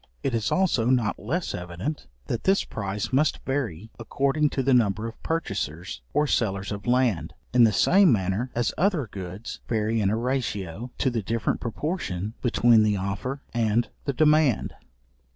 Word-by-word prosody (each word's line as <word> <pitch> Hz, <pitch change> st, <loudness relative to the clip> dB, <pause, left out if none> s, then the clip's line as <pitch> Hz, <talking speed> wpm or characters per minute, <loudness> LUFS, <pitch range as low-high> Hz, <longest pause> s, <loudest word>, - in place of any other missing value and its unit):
It 135 Hz, -, 0 dB
is 115 Hz, -2 st, 0 dB
also 185 Hz, -12 st, +2 dB
not 120 Hz, -4 st, +1 dB
less 165 Hz, -, -2 dB
evident, 90 Hz, -, -5 dB, 0.2 s
that 115 Hz, -, -3 dB
this 195 Hz, +1 st, +3 dB
price 100 Hz, +1 st, -4 dB
must 145 Hz, +3 st, +3 dB
vary 115 Hz, -, -3 dB
according 140 Hz, +6 st, +1 dB
to 135 Hz, -, -2 dB
the 135 Hz, +1 st, +3 dB
number 110 Hz, -2 st, +2 dB
of 115 Hz, -, -10 dB
purchasers, 95 Hz, -, -3 dB
or 150 Hz, -, +2 dB
sellers 100 Hz, -8 st, 0 dB
of 100 Hz, +3 st, -6 dB
land, 115 Hz, -10 st, +1 dB, 0.2 s
in 120 Hz, -1 st, +7 dB
the 110 Hz, -, +4 dB
same 190 Hz, -, +5 dB
manner 100 Hz, +3 st, 0 dB
as 120 Hz, -1 st, 0 dB
other 175 Hz, -6 st, +2 dB
goods 95 Hz, +1 st, -7 dB
vary 110 Hz, 0 st, +1 dB
in 100 Hz, -, +2 dB
a 110 Hz, -, 0 dB
ratio 115 Hz, -4 st, -2 dB
to 130 Hz, -, +1 dB
the 115 Hz, -2 st, -1 dB
different 115 Hz, +3 st, -1 dB
proportion 115 Hz, -, -3 dB
between 120 Hz, -2 st, +4 dB
the 105 Hz, -1 st, +2 dB
offer 100 Hz, +9 st, -3 dB
and 115 Hz, 0 st, +1 dB, 0.2 s
the 140 Hz, -, 0 dB
demand. 150 Hz, -3 st, +3 dB
115 Hz, 165 wpm, -25 LUFS, 100-135 Hz, 0.2 s, in